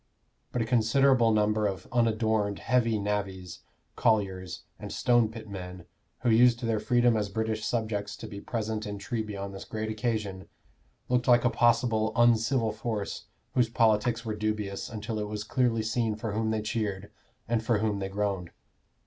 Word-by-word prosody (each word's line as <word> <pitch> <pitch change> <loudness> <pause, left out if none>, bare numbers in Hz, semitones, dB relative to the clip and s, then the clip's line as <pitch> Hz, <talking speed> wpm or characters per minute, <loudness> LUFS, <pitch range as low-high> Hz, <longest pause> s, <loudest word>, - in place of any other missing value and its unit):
But 120 - 0
a - - -3
considerable 120 +1 +4
number 105 0 +2
of 95 -2 -5
unadorned 110 -3 +1
heavy 115 -3 +1
navvies, 95 -3 -3 0.4
colliers, 95 -5 0 0.2
and - - -7
stone 120 -3 +3
pit 110 -1 -9
men, 90 -3 -8 0.4
who 120 - +2
used 120 +1 +5
their 115 -2 +1
freedom 120 +2 +3
as 105 -2 -1
British 110 +1 -2
subjects 105 -3 -2
to - - -8
be 100 0 -8
present 110 -2 -3
in 105 0 -4
Treby 110 -1 -4
on 100 0 -4
this 95 - -8
great 110 0 -4
occasion, 105 -4 -3 0.6
looked 125 0 +1
like 120 -1 +5
a 125 - +4
possible 115 -2 +2
uncivil 115 0 +3
force 110 -1 -4 0.3
whose 120 -3 +2
politics 115 +1 +2
were 110 - -2
dubious 105 -2 -3
until 110 0 -4
it 105 - -2
was 105 0 -4
clearly 115 0 +1
seen 115 -1 0
for 110 0 -4
whom 110 +2 -1
they 110 -1 -1
cheered 105 -3 -3 0.4
and 115 0 0
for 115 -1 +2
whom 105 -1 0
they 95 0 -3
groaned. 100 -3 -2
110 Hz, 165 wpm, -28 LUFS, 105-115 Hz, 0.6 s, used